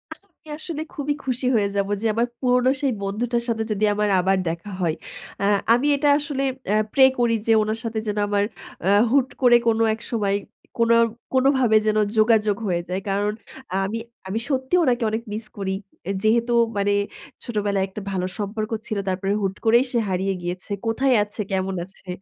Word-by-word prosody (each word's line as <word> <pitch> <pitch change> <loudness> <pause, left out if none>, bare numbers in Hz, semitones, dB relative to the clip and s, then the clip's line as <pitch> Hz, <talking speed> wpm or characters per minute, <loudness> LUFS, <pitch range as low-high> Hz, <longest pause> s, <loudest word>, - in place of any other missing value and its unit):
আমি 390 -5 -25
আসলে 310 -1 -5
খুবই 290 0 -1
খুশি 255 -1 -2
হয়ে 205 -2 +3
যাবো, 200 0 0
যে - - -3
আমার 230 +2 +1
পুরনো 250 0 +3
সেই 275 -2 +2
বন্ধুটার 235 +4 -1
সাথে 225 -2 0
যদি 215 +1 +1
আমার 210 0 0
আবার 190 +2 +2
দেখা 170 +5 -4
হয়। 165 -3 +1 0.4
অ্যাঁ 200 +1 +3 0.2
আমি 255 +5 +2
এটা 290 +1 0
আসলে 285 -2 -3 0.3
অ্যাঁ 215 +1 +3
প্রে 265 - +6 0.2
করি 240 -1 +3
যে, 225 - +4
ওনার 215 +1 -2
সাথে 225 -1 -2
যেন 210 0 -2
আমার 205 0 +1 0.4
অ্যাঁ 200 +3 +4
হুট 265 -1 +4
করে 245 -2 +6
কোন 225 - +3 0.2
এক 225 - -8
সময় 205 -4 +1 0.4
কোনো, 230 0 +4 0.4
কোনোভাবে 260 -3 +3
যেন 215 - +2 0.2
যোগাযোগ 215 -2 +4
হয়ে 175 -1 0
যায়। 185 +1 -1
কারণ 205 +2 +1 0.5
আমি, 210 +4 -3 0.3
আমি 200 +4 -2
সত্যিই 265 +6 +1
ওনাকে 245 -4 +1
অনেক 220 +2 -3
মিস 215 +1 -4
করি। 190 -1 -2 0.3
অ্যা 195 - -2
যেহেতু 235 +2 +2 0.2
মানে 200 0 +2 0.5
ছোটবেলায় 205 -4 -1
একটা 195 +2 -8
ভালো 185 -1 -1
সম্পর্ক 215 +2 -3 0.2
ছিল, 215 - -2
তারপরে 195 +2 -1
হুট 195 -1 -1
করেই 235 +3 +5
সে 240 - +1
হারিয়ে 190 +1 0
গিয়েছে। 180 +3 -5 0.2
কোথায় 255 +3 +2
আছে, 205 +2 -12
কেমন 190 0 -1
আছে, 190 0 -20
215 Hz, 180 wpm, -23 LUFS, 200-245 Hz, 0.5 s, প্রে